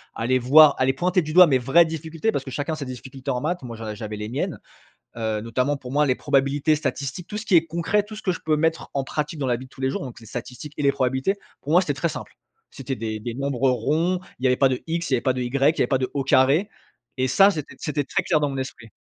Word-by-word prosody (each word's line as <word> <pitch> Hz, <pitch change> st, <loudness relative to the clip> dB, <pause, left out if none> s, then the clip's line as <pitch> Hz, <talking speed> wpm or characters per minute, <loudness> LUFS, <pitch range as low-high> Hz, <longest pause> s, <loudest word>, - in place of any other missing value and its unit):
allait 125 Hz, +3 st, +1 dB
voir 145 Hz, +4 st, +7 dB
allait 130 Hz, 0 st, +3 dB
pointer 180 Hz, +5 st, +1 dB
du 155 Hz, -, -5 dB
doigt 180 Hz, +1 st, +9 dB
mes 135 Hz, -4 st, +3 dB
vraies 155 Hz, +7 st, +5 dB
difficultés, 160 Hz, +5 st, -3 dB
parce 135 Hz, -, -2 dB
que 130 Hz, -, -8 dB
chacun 145 Hz, +5 st, -2 dB
a -, -, -2 dB
ses 145 Hz, -3 st, -6 dB
difficultés 130 Hz, +2 st, -6 dB
en 125 Hz, -, -1 dB
maths, 175 Hz, +5 st, -2 dB
moi, 120 Hz, -2 st, -7 dB
je 110 Hz, -1 st, -6 dB
j'avais 105 Hz, 0 st, -6 dB
les 105 Hz, -, -5 dB
miennes, 125 Hz, -, -3 dB, 0.6 s
heu, 110 Hz, -2 st, -2 dB
notamment 125 Hz, +6 st, -1 dB
pour 125 Hz, -2 st, -9 dB
moi 150 Hz, +1 st, +3 dB
les 130 Hz, -3 st, +2 dB
probabilités 140 Hz, +4 st, +1 dB
statistiques, 140 Hz, +3 st, -4 dB
tout 210 Hz, -, -5 dB
ce 215 Hz, -, -6 dB
qui 195 Hz, -, +3 dB
est 165 Hz, -1 st, +5 dB
concret, 170 Hz, +5 st, 0 dB
tout 215 Hz, +1 st, -10 dB
ce -, -, -8 dB
que 190 Hz, -, 0 dB
je -, -, -7 dB
peux 155 Hz, -1 st, +2 dB
mettre 160 Hz, +1 st, 0 dB
en 135 Hz, -1 st, -1 dB
pratique 150 Hz, +3 st, -3 dB
dans 135 Hz, -, -1 dB
la 120 Hz, -, +2 dB
vie 125 Hz, +2 st, -8 dB
de -, -, -18 dB
tous 130 Hz, -, -18 dB
les 130 Hz, -, +1 dB
jours -, -, -3 dB
donc 125 Hz, -3 st, -8 dB
les 115 Hz, -, -14 dB
statistiques 125 Hz, +6 st, -8 dB
et -, -, -2 dB
les 140 Hz, -, +4 dB
probabilités, 130 Hz, +9 st, 0 dB, 0.3 s
pour 145 Hz, -, -5 dB
moi 175 Hz, -, +7 dB
c'était 155 Hz, -6 st, -1 dB
très 160 Hz, +5 st, -1 dB
simple. -, -, -8 dB, 0.4 s
C'était 135 Hz, -1 st, -5 dB
des 110 Hz, -2 st, -4 dB
des 115 Hz, +2 st, -5 dB
nombres 135 Hz, -1 st, 0 dB
ronds, 155 Hz, +9 st, 0 dB, 0.2 s
il -, -, -11 dB
y -, -, +4 dB
avait 125 Hz, 0 st, +2 dB
pas 135 Hz, -, +5 dB
de 130 Hz, -, -2 dB
«x», 165 Hz, +1 st, -2 dB
il -, -, +3 dB
y -, -, +6 dB
avait 120 Hz, -, -1 dB
pas 130 Hz, 0 st, +1 dB
de 125 Hz, -, -3 dB
«y», 125 Hz, -, -1 dB, 0.3 s
il -, -, -5 dB
y -, -, +3 dB
avait 120 Hz, -, +2 dB
pas 130 Hz, -, +1 dB
de 130 Hz, -, -1 dB
«au 140 Hz, -2 st, -1 dB
carré» 140 Hz, +8 st, +3 dB, 0.5 s
et 130 Hz, 0 st, +1 dB
ça 195 Hz, +10 st, +6 dB
c'était 150 Hz, -5 st, -6 dB
c'était 150 Hz, -1 st, -2 dB
très -, -, -1 dB
clair 155 Hz, -, +2 dB
dans 145 Hz, -1 st, 0 dB
mon 135 Hz, -, -5 dB
esprit. 130 Hz, -3 st, -6 dB
140 Hz, 295 wpm, -23 LUFS, 125-155 Hz, 0.6 s, doigt